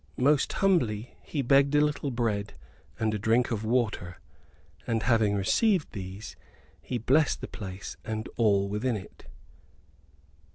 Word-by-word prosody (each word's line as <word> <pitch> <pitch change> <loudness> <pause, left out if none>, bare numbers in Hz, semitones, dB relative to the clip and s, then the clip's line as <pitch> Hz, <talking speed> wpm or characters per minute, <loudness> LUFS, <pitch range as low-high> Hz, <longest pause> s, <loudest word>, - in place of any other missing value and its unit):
Most 140 +2 +3
humbly 125 - +1
he 145 -3 -3
begged 140 +3 +4
a 145 - +5
little 150 -1 0
bread 110 -5 -2 0.4
and 110 -1 +1
a 105 - -2
drink 115 +4 +2
of 110 -2 -2
water; 110 -6 -1 0.7
and, 115 -2 0
having 110 -4 +3
received 180 - +2
these, 95 +1 -7 0.5
he 125 - -3
blessed 135 +6 +2
the - - -6
place 95 -2 -7
and 110 0 -4
all 100 -4 +3
within 105 +4 -1
it. 95 - -13
115 Hz, 135 wpm, -28 LUFS, 105-135 Hz, 0.7 s, a